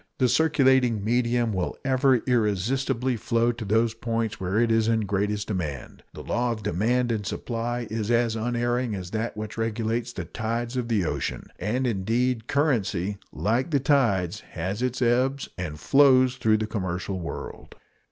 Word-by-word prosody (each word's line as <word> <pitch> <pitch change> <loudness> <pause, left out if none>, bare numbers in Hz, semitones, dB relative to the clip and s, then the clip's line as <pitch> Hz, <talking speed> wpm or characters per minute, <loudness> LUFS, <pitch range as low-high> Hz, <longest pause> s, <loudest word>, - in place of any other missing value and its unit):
The 130 - +3
circulating 130 -7 +3
medium 120 0 +1
will 90 -2 -2
ever 130 -2 +3
irresistibly 125 +2 0
flow 115 +1 +1
to 120 -1 -7
those 110 +2 +2
points 115 -1 -2
where 95 +2 -1
it 115 -1 +2
is 115 -1 +3
in 115 -1 +2
greatest 105 +1 -1
demand. 80 - -4
The - - -8
law 120 +1 0
of 110 -2 -5
demand 115 +6 +1
and 110 -2 -1
supply 120 +3 -3
is 110 -1 -2
as 115 -1 +2
unerring 120 0 -1
as 90 -2 -6
that 110 0 -3
which 110 +1 -5
regulates 115 +1 -1
the - - -6
tides 115 +2 -3
of 125 -2 -1
the 105 -6 +1
ocean; - - -3
and, 120 +8 -1
indeed, 115 +2 0
currency, 105 - 0
like 115 - 0
the 145 -3 +2
tides, 110 - +2
has 95 +5 -5
its 125 0 0
ebbs 130 +3 +1
and 80 -4 -5
flows 130 - +5
throughout 110 -1 +2
the - - 0
commercial 95 -2 -3
world. 85 - -7
115 Hz, 160 wpm, -25 LUFS, 105-125 Hz, -, flows